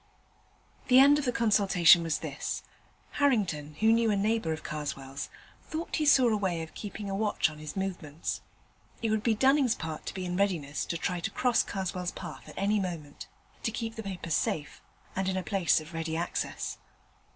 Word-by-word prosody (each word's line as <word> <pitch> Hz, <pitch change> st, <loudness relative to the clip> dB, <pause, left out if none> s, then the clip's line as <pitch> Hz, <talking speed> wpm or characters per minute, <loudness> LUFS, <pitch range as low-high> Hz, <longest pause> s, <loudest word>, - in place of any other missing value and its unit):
The 255 Hz, -, +6 dB
end 285 Hz, +2 st, +8 dB
of 290 Hz, -, -2 dB
the 250 Hz, -, +2 dB
consultation 195 Hz, -7 st, +5 dB
was 165 Hz, -2 st, 0 dB
this. -, -, -4 dB, 0.6 s
Harrington, 180 Hz, -, +1 dB
who 220 Hz, +1 st, +6 dB
knew 230 Hz, 0 st, +3 dB
a 210 Hz, -, +3 dB
neighbour 210 Hz, -3 st, +1 dB
of 155 Hz, -, -4 dB
Karswell's, 140 Hz, -2 st, -5 dB, 0.3 s
thought 320 Hz, +2 st, -4 dB
he 305 Hz, -2 st, +1 dB
saw 260 Hz, -3 st, +6 dB
a 220 Hz, -, +2 dB
way 180 Hz, -5 st, -1 dB
of 160 Hz, -, -10 dB
keeping 205 Hz, 0 st, -6 dB
a 195 Hz, -, -3 dB
watch 205 Hz, -5 st, +1 dB
on 150 Hz, -, -12 dB
his 155 Hz, -1 st, -7 dB
movements. 175 Hz, -5 st, -3 dB, 0.6 s
It 225 Hz, -, +1 dB
would 220 Hz, -1 st, +1 dB
be 225 Hz, 0 st, +2 dB
Dunning's 265 Hz, 0 st, +4 dB
part 160 Hz, -1 st, -6 dB
to -, -, -4 dB
be 185 Hz, -1 st, -3 dB
in 180 Hz, 0 st, -2 dB
readiness 165 Hz, -9 st, 0 dB
to 170 Hz, -, -2 dB
try 180 Hz, +1 st, -2 dB
to 170 Hz, -, -2 dB
cross 250 Hz, -2 st, +2 dB
Karswell's 185 Hz, -2 st, -3 dB
path -, -, -8 dB
at -, -, -12 dB
any 205 Hz, +2 st, +2 dB
moment, 165 Hz, -6 st, -5 dB, 0.3 s
to -, -, 0 dB
keep 225 Hz, 0 st, -4 dB
the 225 Hz, -, -6 dB
paper 185 Hz, -5 st, -6 dB
safe 150 Hz, 0 st, -1 dB, 0.3 s
and 190 Hz, 0 st, 0 dB
in 190 Hz, -, -1 dB
a 185 Hz, -, -2 dB
place 190 Hz, -6 st, +2 dB
of 155 Hz, +2 st, -11 dB
ready 160 Hz, 0 st, -2 dB
access. 170 Hz, +1 st, -3 dB
190 Hz, 195 wpm, -29 LUFS, 160-225 Hz, 0.6 s, end